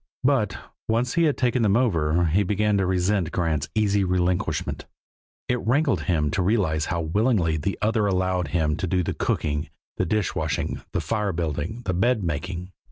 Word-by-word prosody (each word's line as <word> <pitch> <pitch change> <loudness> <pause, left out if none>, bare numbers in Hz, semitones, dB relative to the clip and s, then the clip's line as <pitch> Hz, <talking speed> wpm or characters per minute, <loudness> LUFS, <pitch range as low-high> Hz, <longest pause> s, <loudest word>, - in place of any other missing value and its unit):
But, - - +2 0.3
once 120 +3 +1
he 170 0 +3
had 150 - +1
taken 125 -1 +1
them 105 -1 +3
over, 85 -8 +2
he 85 +5 +2
began 105 +2 +1
to 95 -2 +1
resent 90 -1 +1
Grant's 80 -5 -1
easy 105 -2 +2
relinquishment; 90 -1 -1 0.6
it 125 0 0
rankled 140 +5 +1
him 75 -5 +1
to 95 - 0
realize 90 -6 +1
how 85 -1 -1
willingly 90 0 +1
the 80 +6 -2
other 110 -1 +2
allowed 95 -2 0
him 75 -1 0
to 95 - -2
do 90 +1 +1
the - - -2
cooking, 75 0 -1 0.3
the - - +1
dish 110 -4 0
washing, - - -2
the - - -1
fire 105 -2 -1
building, 80 - -3
the 95 - 0
bed 110 +4 +2
making. 85 +3 -4
95 Hz, 175 wpm, -24 LUFS, 85-110 Hz, 0.6 s, he